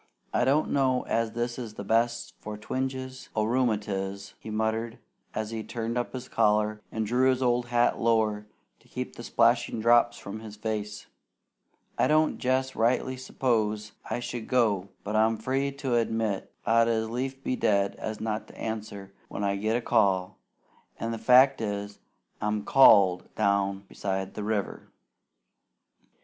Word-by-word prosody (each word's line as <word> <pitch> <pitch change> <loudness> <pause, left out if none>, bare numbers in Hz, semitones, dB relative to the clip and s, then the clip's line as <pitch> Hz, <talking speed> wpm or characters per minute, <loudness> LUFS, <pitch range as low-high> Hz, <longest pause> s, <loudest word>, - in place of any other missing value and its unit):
"I - - +2
don't 145 +4 +2
know 130 -2 +2
as 115 -1 -1
this 120 +1 -2
is 110 -3 -7
the 100 - -6
best 120 +3 0
for 105 0 -7
twinges 130 +3 -4
o' 110 - +2
rheumatiz," 105 -5 -1
he - - -9
muttered, 110 +2 -1 0.4
as 110 0 -3
he 110 -1 -4
turned 115 0 -4
up 120 0 -2
his 130 -1 -6
collar 105 -1 +1
and 110 -1 -2
drew 125 +4 +3
his 130 0 +1
old 120 -1 +1
hat 120 0 +2
lower 110 -2 +1 0.3
to - - -25
keep - - -6
the - - -8
splashing - - +2
drops 120 +1 +4
from 100 +2 -7
his 110 -1 -9
face. 105 -1 -4 0.9
"I - - +4
don't 155 0 +2
jest 130 +1 0
rightly 125 +3 +1
s'pose 110 -5 -1 0.2
I - - -1
should 120 -2 -5
go; 105 -7 +1
but 105 +1 -3
I'm 110 +1 +3
free 135 +5 -1
to 135 -2 -3
admit 115 -3 0
I'd 115 +1 +4
as 110 -1 0
lief 130 +3 -4
be 130 - 0
dead 100 -4 +1
as 110 -1 -5
not 110 0 -3
to - - -15
answer 105 -3 -5
when 100 - -5
I 100 0 +1
get 110 +3 0
a - - -3
call, 95 -5 +1 0.6
an' 115 - -2
the 115 - -4
fact 130 +4 +5
is, 100 -1 -4 0.4
I'm 105 0 -1
CALLED 100 -9 +5
down 100 -2 +1
beside 95 -1 -4
the 105 - -5
river." 105 -2 -3
110 Hz, 160 wpm, -27 LUFS, 105-125 Hz, 0.9 s, fact